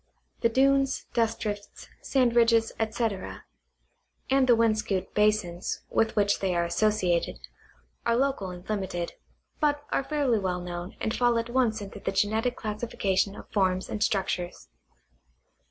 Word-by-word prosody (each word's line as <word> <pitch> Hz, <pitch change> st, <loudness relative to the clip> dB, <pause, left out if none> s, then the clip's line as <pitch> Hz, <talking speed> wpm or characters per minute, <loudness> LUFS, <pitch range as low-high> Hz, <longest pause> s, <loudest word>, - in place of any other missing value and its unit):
The 230 Hz, -, +3 dB
dunes, 270 Hz, +2 st, +2 dB
dust 230 Hz, -1 st, +1 dB
drifts, 205 Hz, -1 st, -5 dB
sand 250 Hz, -3 st, +2 dB
ridges, 230 Hz, -1 st, +4 dB
etc., 220 Hz, -3 st, -2 dB, 0.9 s
and 270 Hz, -1 st, +4 dB
the 240 Hz, -, +6 dB
wind 225 Hz, -1 st, +3 dB
scooped 190 Hz, -3 st, -2 dB
basins 210 Hz, -4 st, 0 dB
with 225 Hz, 0 st, +1 dB
which 205 Hz, -1 st, +2 dB
they 190 Hz, -2 st, 0 dB
are 170 Hz, 0 st, +2 dB
associated, 180 Hz, -2 st, +1 dB, 0.7 s
are 235 Hz, -, +2 dB
local 260 Hz, -7 st, 0 dB
and 180 Hz, 0 st, -10 dB
limited, 190 Hz, -5 st, -3 dB, 0.5 s
but 290 Hz, -1 st, +1 dB
are -, -, +1 dB
fairly 275 Hz, -6 st, +1 dB
well 185 Hz, -2 st, -1 dB
known 175 Hz, +1 st, -6 dB
and 220 Hz, -, -1 dB
fall 240 Hz, -1 st, +3 dB
at 230 Hz, +1 st, -2 dB
once 235 Hz, -4 st, +1 dB
into 200 Hz, 0 st, -8 dB
the -, -, -2 dB
geuetic 220 Hz, +5 st, +1 dB
classification 210 Hz, -2 st, -1 dB
of -, -, -11 dB
forms 185 Hz, -2 st, +1 dB
and 210 Hz, -, -4 dB
structures. 185 Hz, -4 st, -1 dB
215 Hz, 145 wpm, -27 LUFS, 190-235 Hz, 0.9 s, the